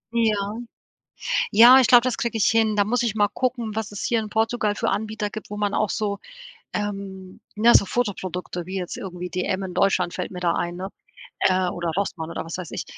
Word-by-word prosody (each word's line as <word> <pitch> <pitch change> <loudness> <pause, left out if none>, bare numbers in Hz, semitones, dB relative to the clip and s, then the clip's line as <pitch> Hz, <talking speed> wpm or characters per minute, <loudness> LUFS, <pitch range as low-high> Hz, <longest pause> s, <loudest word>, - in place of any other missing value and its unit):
Ja. 215 -1 0 0.9
Ja, 240 +5 +8
ich 255 - +3
glaube, 245 -1 +8
das 255 -1 -1
kriege 235 -1 -2
ich 210 - +3
hin. 225 -1 +2
Da 205 - +4
muss 240 +4 0
ich 225 -3 -1
mal 205 -1 +4
gucken, 235 0 -2
was 220 -1 -3
es 205 - -6
hier 230 -1 +1
in 215 - -6
Portugal 220 -1 0
für - - -1
Anbieter 215 0 -2
gibt, 215 0 -9
wo 210 - -5
man 205 -1 -1
auch 215 -2 +1
so 200 -2 -2 0.5
ähm, 195 -2 -5 0.2
ne, 230 +3 +5
so - - +6
Fotoprodukte, 185 -6 -3
wie 185 +2 -6
jetzt 180 -2 -5
irgendwie 180 -1 -6
DM 185 +2 -2
in 185 -1 -6
Deutschland 180 -2 +1
fällt 180 - -4
mir 180 -1 -7
da 170 -1 +1
ein, 175 0 -2
ne? 190 +2 -5 0.5
Äh, 185 -1 +2
oder 175 -1 -2
Rossmann 170 -5 -2
oder - - -5
was 165 - -5
weiß 180 -5 -7
ich. - - -4
205 Hz, 215 wpm, -23 LUFS, 185-220 Hz, 0.9 s, Ja